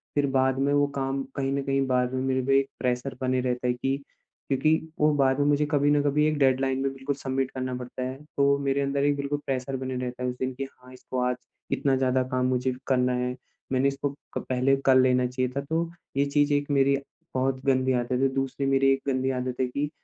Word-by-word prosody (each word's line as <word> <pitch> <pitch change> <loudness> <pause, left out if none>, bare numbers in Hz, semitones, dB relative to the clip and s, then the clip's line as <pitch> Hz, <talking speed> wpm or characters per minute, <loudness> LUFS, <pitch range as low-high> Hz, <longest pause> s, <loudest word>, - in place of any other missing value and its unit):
फिर 145 -1 +3
बाद 130 0 +3
में 140 +1 +2
वो 145 0 +4
काम 135 0 -1
कहीं 135 -1 -1
न 140 - 0
कहीं 135 0 +1
बाद 125 -1 +1
में 130 - -1
मेरे 130 0 +1
पे 135 0 +4
एक 135 0 -2
प्रेशर 125 +1 -1
बने 130 0 +1
रहता 125 0 -1
है 125 - +2
की, 135 +2 -1 0.5
क्योंकि 135 +3 +2 0.3
वो 150 0 +4
बाद 135 -1 +2
में 145 - +3
मुझे 145 0 +3
कभी 145 -1 +3
न 145 0 +4
कभी 145 +1 +2
एक 155 -1 0
डेडलाइन 135 -1 +2
में 135 0 -1
बिल्कुल 135 +1 -3
सबमिट 135 -1 -2
करना 130 -1 -3
पड़ता 125 +1 -6
है। 130 +1 -3 0.2
तो 140 0 +4
मेरे 140 0 0
अंदर 140 0 0
एक 145 0 +3
बिल्कुल 140 +1 -2
प्रेशर 135 0 -2
बने 130 0 -4
रहता 125 0 -4
है 125 - 0
उस 125 - -4
दिन, 130 0 -1
की 135 +2 -4
हाँ, 130 -1 -12
इसको 130 0 -5
आज 125 0 +1 0.4
इतना 135 -2 +2
ज़्यादा 130 0 +2
काम 130 0 +1
मुझे 130 0 +1
करना 125 -1 +2
है। 125 0 -1 0.4
मैंने 130 +1 +3
इसको 140 +1 -1 0.3
क - - 0
पहले, 130 +1 +3
कर 135 -1 +3
लेना 130 -1 +4
चाहिए 125 0 -1
था, 140 - 0
तो 165 +4 -2 0.3
ये 140 - +3
चीज़ 145 +1 +2
एक 145 0 0
मेरी 135 -1 +4 0.5
बहुत 130 0 0
गंदी 130 -1 +3
आदत 120 0 -1
है। 130 +2 +3
दूसरी 135 +1 -2
मेरी 135 0 +4
एक 135 - -2
गंदी 130 -1 +1
आदत 125 -1 -2
है 130 - +2
कि, 140 +4 -2
135 Hz, 235 wpm, -26 LUFS, 130-140 Hz, 0.5 s, वो